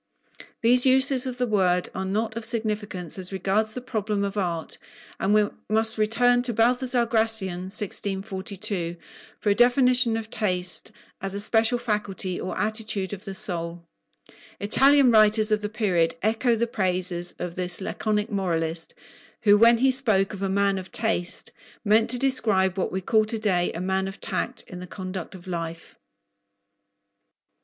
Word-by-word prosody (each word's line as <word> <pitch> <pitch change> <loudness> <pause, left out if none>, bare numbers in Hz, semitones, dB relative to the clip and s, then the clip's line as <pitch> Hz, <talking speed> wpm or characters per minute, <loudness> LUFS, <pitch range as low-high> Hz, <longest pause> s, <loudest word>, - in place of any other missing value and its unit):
These 245 +3 +7
uses 265 0 +4
of 250 -1 -5
the 250 - 0
word 185 -5 +1
are 190 - -4
not 220 +3 -2
of 230 - -5
significance 210 -6 -3
as 185 0 0
regards 200 +3 -1
the 250 - -5
problem 215 -4 -3
of 200 0 -4
art, 170 -5 -3 0.4
and 195 - 0
we 210 0 +3 0.2
must 220 +1 +3
return 245 +3 +2
to 245 -2 -1
Baltasar 245 +2 +2
Gracian 220 -5 -1
(1642) 195 -3 -2 0.4
for 205 - 0
a - - +4
definition 245 0 +3
of 225 0 -7
taste 180 -4 0 0.3
as 195 0 -5
a - - -3
special 225 +3 +2
faculty 210 -5 -3
or 185 - -5
attitude 215 -1 -1
of 195 0 -9
the 195 -1 -6
soul. 170 -2 -2 0.8
Italian 270 +6 +5
writers 215 0 +4
of 215 0 +1
the 210 - -4
period 180 -7 0
echo 230 +3 +1
the 230 +1 0
praises 180 -5 +1
of 175 -1 -5
this 180 -1 0
laconic 210 +3 -2
moralist, 165 -4 -3 0.5
who, 205 -1 +6
when 230 +2 +5
he 265 +3 +3
spoke 220 -7 +1
of 200 - -8
"a 195 - -1
man 200 0 +1
of 185 - -10
taste," 215 -6 -2 0.3
meant 220 +2 +3
to 250 - 0
describe 220 -8 +1
what 190 - -2
we 190 - -3
call 215 +4 +2
to 220 +1 -3
day 185 -5 0
"a 165 - -6
man 190 +1 -1
of 195 - -9
tact" - - -3
in 180 - -9
the 180 - -9
conduct 185 -1 -7
of 175 - -13
life. 165 -2 -6
210 Hz, 165 wpm, -24 LUFS, 185-225 Hz, 0.8 s, These